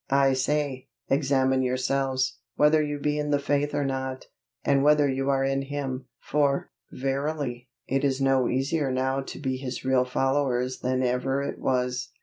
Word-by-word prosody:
I 135 0 +4
say, 135 0 -1 0.2
examine 135 -2 +2
yourself, 130 +1 0 0.2
whether 150 +1 +4
you 145 -1 -2
be 150 +1 -1
in 150 0 -2
the 145 - +3
faith 145 +1 0
or 145 -1 0
not, 130 -1 -3 0.4
and 140 -1 +3
whether 150 0 +5
you 135 0 -1
are 135 -1 +2
in 135 0 +1
Him; 135 -2 -4
for, 140 -1 0 0.2
verily, 135 -2 -3 0.2
it 135 +1 0
is 135 -1 +1
no 135 -2 +3
easier 135 +2 0
now 130 +1 0
to 135 - -8
be 130 -2 -2
His 130 -1 -5
real 130 -1 +3
followers 130 -1 0
than 130 +1 0
ever 130 +2 0
it - - -4
was. 125 -1 -1
135 Hz, 165 wpm, -26 LUFS, 130-145 Hz, 0.4 s, whether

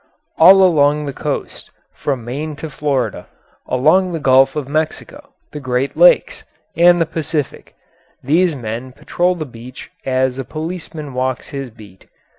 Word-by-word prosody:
All 190 +4 +8
along 150 -4 +3
the 140 - -5
coast, - - -5 0.2
from 130 -5 -3
Maine 145 +5 -5
to 155 +1 -8
Florida, 140 -4 -2 0.4
along 170 +8 +2
the 165 - -3
Gulf 135 -1 +4
of 150 -4 -3
Mexico, 160 - -4 0.2
the 150 - -7
Great 130 0 -2
Lakes, - - +4 0.3
and 175 +1 +5
the 165 - +2
Pacific, 155 -3 -4 0.5
these 165 +5 +2
men 120 +1 -6
patrol 180 +6 -1
the 160 -3 -5
beach 125 0 -12
as 130 0 0
a - - -2
policeman 155 -1 -7
walks 130 0 -3
his 135 -3 -6
beat. 105 -4 -17
145 Hz, 145 wpm, -17 LUFS, 130-165 Hz, 0.5 s, All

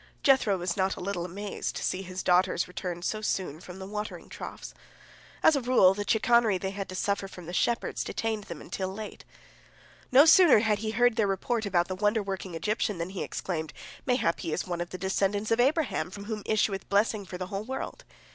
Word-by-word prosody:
Jethro 260 -8 +4
was 175 0 -2
not 190 0 +1
a - - -9
little 180 -2 -3
amazed 200 +3 -4
to - - -4
see 185 - -1
his 185 0 -6
daughters 180 0 +3
return 180 -1 -5
so 215 +3 -2
soon 185 -7 -2
from 180 +1 -10
the 190 - -7
watering 210 +2 -6
troughs. - - -8 0.7
As 315 - +6
a 280 - 0
rule, 240 -7 +5
the 205 +1 -4
chicanery 225 -2 +4
they 190 +1 -3
had 195 0 -5
to 185 - -6
suffer 200 +1 -1
from 180 -3 -11
the 175 - -7
shepherds 235 +5 0
detained 220 -2 -3
them 170 -3 -8
until 190 -1 -4
late. 215 +2 -8 0.9
No 270 +4 +8
sooner 335 - +8
had 210 -2 +1
he 215 +1 -2
heard 245 +1 +3
their 215 - +3
report 215 +3 -1
about 175 -3 +2
the 185 - -3
wonder 210 +3 +1
working 190 -3 -5
Egyptian 210 +3 -1
than 170 +2 -4
he 190 - -5
exclaimed, 160 -4 -4 0.3
"Mayhap 245 -10 +1
he 165 - -4
is - - -1
one 175 -1 -3
of 175 - -4
the 185 - -6
descendants 195 +3 0
of 225 - +3
Abraham, 280 - +1
from 200 +2 -8
whom 215 -1 -4
issueth 205 -3 0
blessing 205 +1 +2
for 180 -1 -7
the 185 - -4
whole 195 +1 -2
world." 265 - -5
200 Hz, 215 wpm, -28 LUFS, 185-220 Hz, 0.9 s, No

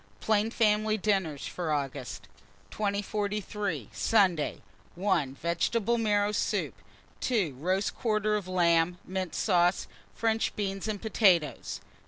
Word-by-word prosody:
PLAIN 215 0 +2
FAMILY 215 -1 +2
DINNERS 190 -8 0
FOR 170 -3 -3
AUGUST. 140 -3 -3 0.4
2043. 205 - -2
Sunday. 175 - +2 0.3
1. 170 -8 0
Vegetable 205 +9 0
marrow 205 -2 +2
soup. 210 - -1 0.5
2. 205 - 0
Roast 185 +6 0
quarter 215 -2 +1
of 205 -3 -3
lamb, 175 -1 +2
mint 185 -2 -3
sauce, 175 -2 +2 0.3
French 225 0 0
beans 195 -1 -3
and 210 -1 -3
potatoes. 170 - +2
195 Hz, 110 wpm, -29 LUFS, 170-215 Hz, 0.5 s, PLAIN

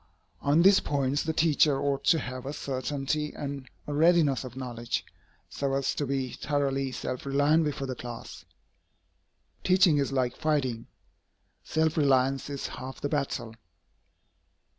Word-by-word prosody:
On 150 +4 +4
these 195 +1 +7
points 140 0 0
the 160 - -1
teacher 155 -3 +3
ought 140 -1 -1
to 165 - +5
have 130 -3 -5
a 140 - -3
certainty 145 +2 -2
and 140 -3 -6 0.2
a 145 - -4
readiness 155 -3 +4
of 125 -1 -9
knowledge, 120 -2 -3 0.4
so 140 -1 -2
as 135 -1 0
to 145 - -2
be 135 -2 -1
thoroughly 135 -2 -1
self 130 0 -4
reliant 145 +4 +3
before 145 -2 -2
the 130 - -3
class. 120 -2 -8 1.2
Teaching 185 -5 +4
is 140 -1 0
like 130 -2 0
fighting. 140 -7 -1 0.8
Self 160 0 0
reliance 135 -2 +2
is 140 -1 -4
half 130 +1 -7
the 145 - -2
battle. 135 -6 -2
140 Hz, 140 wpm, -28 LUFS, 130-150 Hz, 1.2 s, these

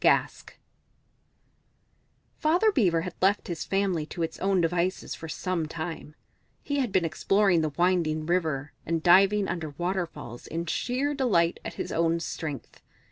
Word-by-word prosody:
Gask - - +2 1.9
Father 350 +8 +3
Beaver 180 - +2
had 180 +1 -5
left 195 +2 +2
his 170 -3 -4
family 195 -5 0
to 170 - -4
its 165 - -4
own 195 -1 +2
devices 175 +2 0
for 160 - -8
some 170 -1 -2
time; 160 -1 -6 0.5
he 285 - -2
had 250 -6 0
been 185 -3 +2
exploring 190 +2 +2
the 155 - 0
winding 170 -4 +1
river, 160 -5 -1
and 165 0 -2
diving 195 +3 +5
under 160 -4 -4
waterfalls 175 -9 -4
in 170 +1 -3
sheer 255 - -1
delight 205 -12 +2
at - - -6
his - - -4
own 165 0 +1
strength. 155 -4 -6
175 Hz, 145 wpm, -27 LUFS, 160-195 Hz, 1.9 s, diving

